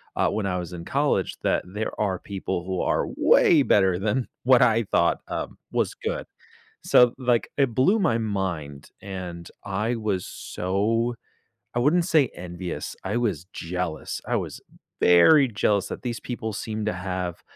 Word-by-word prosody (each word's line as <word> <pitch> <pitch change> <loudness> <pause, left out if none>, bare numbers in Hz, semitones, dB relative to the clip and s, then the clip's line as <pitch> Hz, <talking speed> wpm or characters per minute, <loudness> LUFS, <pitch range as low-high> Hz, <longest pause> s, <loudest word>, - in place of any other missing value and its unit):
uh, - - +2
when 110 - -2
I 90 -2 -1
was 90 0 -6
in 85 -1 -7
college - - 0
that - - +1
there 105 +4 -5
are 95 -4 0
people 95 -3 -4
who 95 -1 -2
are - - +1
way 155 -4 +5
better 95 -7 +3
than 110 +5 0 0.2
what 130 0 +6
I 115 0 +4
thought, 85 -4 +1
um, - - -5
was - - 0
good. - - -4 0.6
So, 125 -1 +5
like, 125 -3 +1
it 135 -5 +2
blew 190 - +4
my 120 - +2
mind, 90 -10 -3
and 90 -3 -7 0.2
I 105 +5 -1
was 105 -5 -2
so 110 +6 -1 0.6
I - - 0
wouldn't 160 +7 +3
say 155 -7 +4
envious, 90 0 -6
I 100 +4 -2
was 110 -7 -1
jealous, 85 -2 -4
I - - 0
was - - -4 0.4
very 130 - +6
jealous 105 -3 +1
that - - -6
these 120 -2 -4
people 110 -3 -4
seem 110 +1 -4
to 110 - +1
have, 90 -1 -4
100 Hz, 165 wpm, -25 LUFS, 90-120 Hz, 0.6 s, what